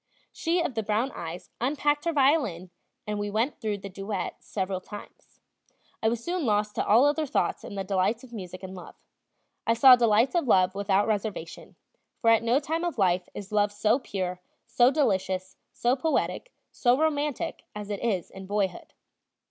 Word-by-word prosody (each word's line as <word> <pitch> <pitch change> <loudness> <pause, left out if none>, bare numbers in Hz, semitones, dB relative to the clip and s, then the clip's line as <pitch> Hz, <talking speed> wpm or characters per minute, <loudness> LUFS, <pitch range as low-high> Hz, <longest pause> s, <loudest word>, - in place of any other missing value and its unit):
She 340 +2 0
of 280 - -2
the 225 - -1
brown 215 +5 0
eyes 170 +1 -7
unpacked 290 +3 +1
her 335 - +2
violin, 265 - +2 0.3
and 210 -1 -3
we 205 0 -2
went 225 +8 -1
through 215 -3 -1
the 200 0 -8
duet 195 -1 -4
several 190 -2 -3
times. 205 +2 -12 0.6
I 220 - +3
was 235 0 -3
soon 355 -1 -2
lost 210 -3 +1
to - - -1
all 230 +6 +6
other 300 +1 +1
thoughts - - -1
in - - -8
the 195 - -2
delights 195 +5 0
of 245 -2 -14
music 185 -3 -8
and 190 0 -7
love. 180 -2 -10 0.7
I 230 - +4
saw 260 +1 +9
delights 235 +1 +3
of 340 -6 +1
love 185 -4 +4
without 200 0 +1
reservation; 205 -6 -4 0.4
for 230 - +4
at 225 - +5
no 235 +4 +2
time 320 +3 -2
of 345 -5 -2
life 180 -3 +1
is 200 0 -8
love 205 -1 +2
so 210 +4 +2
pure, 185 -7 -4 0.2
so 240 +1 +4
delicious, 190 -10 0 0.2
so 245 +2 +1
poetic, 320 - -1 0.2
so 245 0 +2
romantic, 295 -3 -1
as 210 0 -6
it 200 - -4
is 195 -8 -1
in 190 0 -10
boyhood. 200 -3 -2
215 Hz, 180 wpm, -27 LUFS, 195-260 Hz, 0.7 s, saw